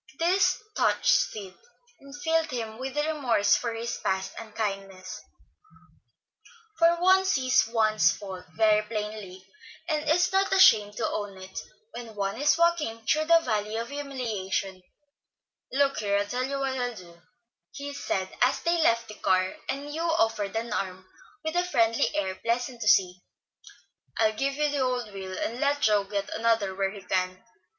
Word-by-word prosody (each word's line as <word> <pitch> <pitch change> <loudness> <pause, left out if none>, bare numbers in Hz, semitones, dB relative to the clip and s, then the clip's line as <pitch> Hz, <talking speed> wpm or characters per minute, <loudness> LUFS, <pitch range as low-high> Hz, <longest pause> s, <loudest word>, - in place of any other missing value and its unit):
This 360 +4 +3 0.2
touched - - +1
Sid, 200 - -1 0.5
and 280 +1 -12
filled 325 -1 +1
him 225 -4 -5
with 265 +2 -5
remorse 295 -9 +2
for 230 -2 -3 0.2
past 190 0 -1
unkindness; 195 -4 -5 1.6
for 335 0 +5
one 375 +2 +5
sees 255 -10 +2
one's 220 -2 +3
faults 190 -3 -8
very 215 -1 +4
plainly, 210 -3 -6 0.4
and 305 -2 -1
is 355 +3 +3
not 385 0 +2
ashamed 210 - +5
to - - 0
own 205 -2 -4
it, 190 0 -8 0.3
when 230 -3 -8
one 200 +4 -2
is 295 +2 +4
walking 315 -10 +1
through 310 +5 +2
the 335 +1 +5
Valley 215 -5 -2
of 230 +1 -4
Humiliation. 225 -10 -3 0.9
"Look 275 +1 +1
here, 200 -1 +1
I'll 205 - 0
tell 250 +5 -2
you 275 +1 -3
what 265 -1 -1
I'll 245 -1 -2
do," 170 -3 -14 0.5
he 285 0 -7
said, 190 -8 -2
as 250 +2 +3
they 340 0 +2
left 230 -6 +2
the 215 - -9
car, 185 -2 +1
and 285 +2 -3
Hugh 320 - -3 0.2
offered 220 -2 0
an 225 0 -2
arm, 185 -2 -4 0.4
with 315 +1 -3
a 355 - +3
friendly 230 -10 +2
air 190 -2 -1
pleasant 235 +4 -2
to - - -2
see. 180 -3 +4 1.0
"I'll 220 -1 +3
give 275 +5 -1
you 300 +1 +1
the 290 -1 -1
old 250 -4 -1
wheel, 190 -1 -6
and 235 +2 -3
let 285 0 +1
Joe 210 -2 +3
get 200 0 -3
another 225 -4 +1
where 195 0 0
he 200 -1 -10
can. 185 +1 -2
225 Hz, 160 wpm, -27 LUFS, 200-280 Hz, 1.6 s, for